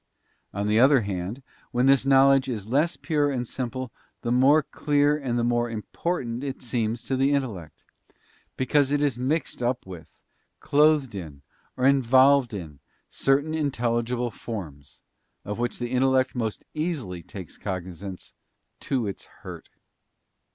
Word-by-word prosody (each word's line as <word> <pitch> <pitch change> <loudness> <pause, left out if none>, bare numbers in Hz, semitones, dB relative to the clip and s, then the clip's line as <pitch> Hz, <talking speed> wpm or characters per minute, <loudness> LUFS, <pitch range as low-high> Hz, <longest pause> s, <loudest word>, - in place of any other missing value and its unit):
On 100 +1 -2
the 105 +1 +3
other 135 +1 +6
hand, 100 +5 -4 0.3
when 125 +1 +1
this 135 -1 +4
knowledge 135 0 +5
is 110 -5 -4
less 150 +8 +1
pure 150 -3 0
and 125 -3 -2
simple 130 0 -4 0.3
the 120 - -1
more 135 +5 +5
clear 145 0 +1
and 130 -5 -2
the 120 - +1
more 120 0 +1
important 120 +2 -3
it 135 -2 -4
seems 115 -1 -2
to 135 - -2
the 135 +2 +2
intellect; 105 - -5 0.7
because 140 +2 +2
it 145 - +2
is 135 -5 0
mixed 135 +1 -1
up 125 +1 -1
with, 90 -4 -10 0.5
clothed 150 -4 +3
'in, 80 -8 -8 0.3
or 125 - -3
involy_d 135 -1 +5
in, 80 -9 -7 0.3
certain 140 +3 +1
intelligible 120 -5 -1
forms, 80 - -8 0.4
of 105 +2 -4
which 120 0 -2
the 120 0 -4
in 125 0 +1
tellect 130 0 +2
most 115 -4 -3
easily 150 - -3
takes 90 +1 -10
cognisance, 95 0 -6 0.5
to 130 -4 -1
its 100 -2 -6 0.2
hurt. - - -9
125 Hz, 145 wpm, -25 LUFS, 110-140 Hz, 0.7 s, other